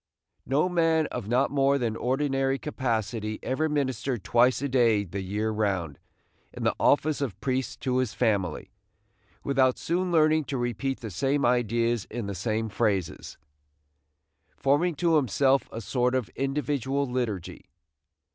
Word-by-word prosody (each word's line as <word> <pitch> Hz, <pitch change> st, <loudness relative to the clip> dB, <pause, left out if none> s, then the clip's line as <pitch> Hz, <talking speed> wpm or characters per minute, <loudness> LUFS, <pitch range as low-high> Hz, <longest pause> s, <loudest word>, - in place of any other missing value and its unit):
No 140 Hz, +6 st, +2 dB
man 165 Hz, -3 st, +2 dB
of 120 Hz, -5 st, -5 dB
not 125 Hz, +4 st, +2 dB
more 140 Hz, 0 st, +3 dB
than 115 Hz, -4 st, -1 dB
ordinary 135 Hz, +1 st, 0 dB
capacity 115 Hz, -6 st, -2 dB
ever 155 Hz, +5 st, 0 dB
ministered 130 Hz, -6 st, -1 dB
twice 125 Hz, +2 st, +3 dB
a 140 Hz, -, -1 dB
day 120 Hz, -6 st, +3 dB
the 100 Hz, +1 st, -5 dB
year 105 Hz, +4 st, -2 dB
round, 95 Hz, -9 st, -1 dB, 0.5 s
in -, -, -7 dB
the -, -, +2 dB
office 145 Hz, +1 st, +2 dB
of 110 Hz, -10 st, -3 dB
priest 130 Hz, -1 st, -2 dB
to 130 Hz, -2 st, 0 dB
his 130 Hz, -4 st, 0 dB
family, 100 Hz, -8 st, 0 dB, 0.7 s
without 130 Hz, -2 st, +2 dB
soon 180 Hz, +2 st, -1 dB
learning 155 Hz, -2 st, +3 dB
to 135 Hz, +2 st, -3 dB
repeat 120 Hz, +2 st, -2 dB
the 110 Hz, -3 st, -6 dB
same 135 Hz, +9 st, 0 dB
ideas 120 Hz, -2 st, +1 dB
in 120 Hz, -1 st, -5 dB
the 100 Hz, -, -4 dB
same 110 Hz, +3 st, -2 dB
phrases, 100 Hz, -5 st, -2 dB, 1.2 s
forming 150 Hz, +5 st, +2 dB
to 165 Hz, +2 st, +3 dB
himself 135 Hz, +1 st, +2 dB
a 115 Hz, -, -6 dB
sort 125 Hz, +1 st, 0 dB
of 130 Hz, -4 st, -1 dB
individual 140 Hz, 0 st, -1 dB
liturgy. 120 Hz, -8 st, -4 dB
130 Hz, 145 wpm, -27 LUFS, 110-140 Hz, 1.2 s, more